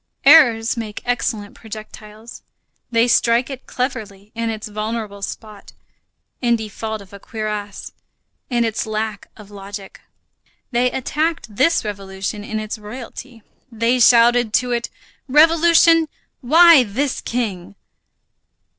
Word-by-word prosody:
Errors 245 Hz, -7 st, +6 dB
make 220 Hz, -3 st, -6 dB
excellent 225 Hz, -4 st, -2 dB
projectiles. 215 Hz, 0 st, -11 dB, 0.5 s
They 230 Hz, 0 st, +2 dB
strike 235 Hz, +2 st, +2 dB
it 265 Hz, -1 st, -9 dB
cleverly 215 Hz, -6 st, -5 dB
in 230 Hz, 0 st, -3 dB
its 220 Hz, 0 st, -5 dB
vulnerable 215 Hz, -1 st, -5 dB
spot, 210 Hz, +1 st, -8 dB, 0.7 s
in 240 Hz, -2 st, +2 dB
default 220 Hz, 0 st, -5 dB
of 195 Hz, -, -20 dB
a 200 Hz, -, -10 dB
cuirass, 210 Hz, -1 st, -6 dB, 0.6 s
in 240 Hz, -2 st, +1 dB
its 220 Hz, 0 st, -2 dB
lack 215 Hz, -1 st, -4 dB
of 210 Hz, -2 st, -14 dB
logic; 200 Hz, 0 st, -10 dB, 0.7 s
they 250 Hz, 0 st, +2 dB
attacked 300 Hz, -2 st, -3 dB
this 270 Hz, +1 st, +2 dB
revolution 200 Hz, 0 st, -5 dB
in 215 Hz, +1 st, -4 dB
its 215 Hz, +1 st, -5 dB
royalty. 230 Hz, +1 st, -10 dB, 0.3 s
They 230 Hz, +2 st, +1 dB
shouted 240 Hz, -1 st, +5 dB
to 250 Hz, -1 st, +1 dB
it: 235 Hz, -1 st, -2 dB, 0.4 s
"Revolution, 330 Hz, +2 st, +5 dB, 0.3 s
why 325 Hz, +3 st, +7 dB
this 255 Hz, +6 st, -2 dB
king?" 200 Hz, -6 st, -4 dB
225 Hz, 120 wpm, -19 LUFS, 210-250 Hz, 0.7 s, why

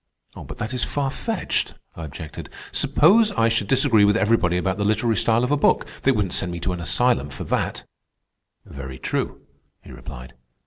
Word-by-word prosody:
"But -, -, -9 dB
that 110 Hz, +4 st, -4 dB
is 125 Hz, -, -1 dB
far 140 Hz, -2 st, -1 dB
fetched," 225 Hz, -, -2 dB, 0.2 s
I 80 Hz, -, -6 dB
objected. 75 Hz, +1 st, -9 dB, 0.2 s
"Suppose 220 Hz, +1 st, +4 dB
I 115 Hz, 0 st, +2 dB
should 110 Hz, -3 st, 0 dB
disagree 130 Hz, -5 st, +4 dB
with 105 Hz, +2 st, +4 dB
everybody 105 Hz, -6 st, +2 dB
about 95 Hz, +2 st, -1 dB
the -, -, 0 dB
literary 110 Hz, +2 st, +1 dB
style 115 Hz, +2 st, +2 dB
of 125 Hz, -, 0 dB
a 145 Hz, -, +3 dB
book. -, -, +2 dB, 0.2 s
They 135 Hz, -, +3 dB
wouldn't 105 Hz, -7 st, -1 dB
send 90 Hz, -2 st, -1 dB
me 85 Hz, -, -5 dB
to 90 Hz, -, -1 dB
an 90 Hz, -, -5 dB
asylum 115 Hz, -, +1 dB
for -, -, -7 dB
that." -, -, -2 dB, 0.8 s
"Very 65 Hz, -2 st, -8 dB
true," -, -, -3 dB, 0.4 s
he -, -, -13 dB
replied. -, -, -10 dB
105 Hz, 185 wpm, -23 LUFS, 85-125 Hz, 0.8 s, Suppose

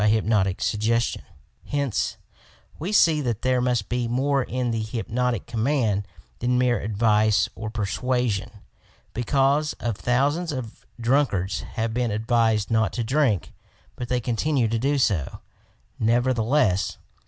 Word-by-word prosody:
THE 105 Hz, -, +3 dB
POVTER 110 Hz, +1 st, +4 dB
OP 110 Hz, -, -2 dB
HYPNOTIC 95 Hz, -4 st, +1 dB
SUGGESTION 115 Hz, +2 st, 0 dB, 0.5 s
Hence 140 Hz, -5 st, -1 dB, 0.6 s
we 175 Hz, +6 st, -3 dB
see 165 Hz, -7 st, +4 dB
that 120 Hz, -5 st, -2 dB
there 130 Hz, -1 st, +2 dB
must 125 Hz, -5 st, 0 dB
be 120 Hz, -1 st, -1 dB
more 135 Hz, +3 st, +1 dB
in 125 Hz, -1 st, -2 dB
the 115 Hz, -1 st, -1 dB
hypnotic 115 Hz, +1 st, -2 dB
command 115 Hz, -4 st, 0 dB, 0.3 s
than 125 Hz, +1 st, +1 dB
mere 125 Hz, -3 st, +2 dB
advice 105 Hz, 0 st, +2 dB
or 110 Hz, -1 st, -6 dB
persuasion, 110 Hz, 0 st, -1 dB, 0.6 s
becauf^o 135 Hz, -1 st, +1 dB
thou 130 Hz, +4 st, +2 dB
sands 170 Hz, +1 st, -3 dB
of 125 Hz, -5 st, -7 dB
drunkards 115 Hz, -6 st, +1 dB
have 115 Hz, 0 st, -2 dB
been 120 Hz, 0 st, 0 dB
advised 110 Hz, -1 st, +1 dB
not 110 Hz, -2 st, +2 dB
to 120 Hz, -, -2 dB
drink, 120 Hz, -, +1 dB, 0.4 s
but 120 Hz, -, -6 dB
they 125 Hz, 0 st, +1 dB
continue 125 Hz, +2 st, 0 dB
to 115 Hz, 0 st, 0 dB
do 140 Hz, +4 st, +1 dB
so, 100 Hz, -, 0 dB, 0.6 s
nevertheless! 115 Hz, -2 st, +2 dB
120 Hz, 140 wpm, -24 LUFS, 110-130 Hz, 0.6 s, POVTER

